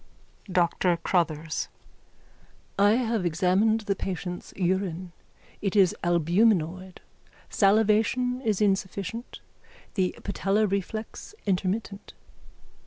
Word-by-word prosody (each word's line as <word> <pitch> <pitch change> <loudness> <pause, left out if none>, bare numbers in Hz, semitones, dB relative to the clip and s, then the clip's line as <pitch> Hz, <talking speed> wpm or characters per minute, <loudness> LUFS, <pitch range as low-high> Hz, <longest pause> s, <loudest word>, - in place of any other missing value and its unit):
DR 175 0 +2
CROTTHERS: 165 -3 0 1.1
I 205 +1 +6
have 230 -4 0
examined 185 +6 +2
the 200 -2 -1
patient's 180 -1 -5
urine. 185 -1 -1 0.5
It 200 0 -1
is 190 -4 +4
albuminoid. 175 +1 +1 0.5
Salivation 220 +5 +2
is 215 -3 0
insufficient, 200 +3 -2 0.5
the 185 -3 0
patellar 200 +2 +1
reflex 215 - -4
intermittent. 195 +1 -2
195 Hz, 85 wpm, -26 LUFS, 180-215 Hz, 1.1 s, I